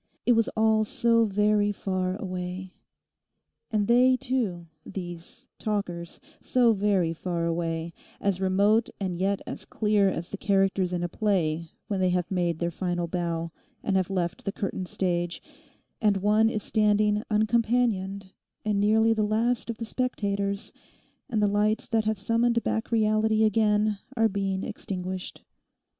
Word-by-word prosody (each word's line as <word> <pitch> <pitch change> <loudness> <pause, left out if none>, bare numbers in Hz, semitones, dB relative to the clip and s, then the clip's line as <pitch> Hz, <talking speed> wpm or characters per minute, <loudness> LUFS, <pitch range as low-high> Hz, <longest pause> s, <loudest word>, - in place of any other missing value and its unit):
It - - +4
was 230 -2 +3
all 220 0 +4
so 230 +1 +3
very 210 0 +2
far 185 -2 -2
away. 185 -1 -5 1.0
And 210 -4 0
they 255 +2 +5
too—these 175 - -5
talkers—so 215 - -1
very 195 -5 +1
far 170 0 -2
away; 165 0 -2 0.3
as 195 -2 0
remote 200 +4 +3
and 190 -3 -2
yet 195 +3 0
as - - -6
clear 210 -2 +2
as 170 -1 -4
the 200 - -4
characters 195 -2 +1
in 175 -1 -2
a - - 0
play 170 -5 0 0.2
when 200 -3 -1
they 185 -1 +2
have 180 0 -1
made 175 -3 0
their 170 +1 -1
final 175 0 -2
bow, 170 -1 -2 0.3
and 195 - 0
have 185 -1 +1
left 180 -1 -2
the 200 - -2
curtained 190 -2 -4
stage, 175 -2 -1 0.6
and 210 -3 +3
one 210 +3 +3
is 215 -2 -3
standing 210 0 +2
uncompanioned 215 -3 +1 0.3
and 210 -2 +1
nearly 220 +2 +4
the 220 - 0
last 225 +3 +1
of 230 - -3
the 230 - -4
spectators, 200 -5 -2 0.6
and 220 -4 +1
the - - +4
lights 210 +2 +1
that 220 -1 +1
have 215 0 0
summoned 230 +3 +1
back 225 - -1
reality 220 0 +3
again 210 -1 +2 0.2
are 225 0 +4
being 195 -2 -2
extinguished. 185 -3 -5
200 Hz, 145 wpm, -27 LUFS, 180-220 Hz, 1.0 s, they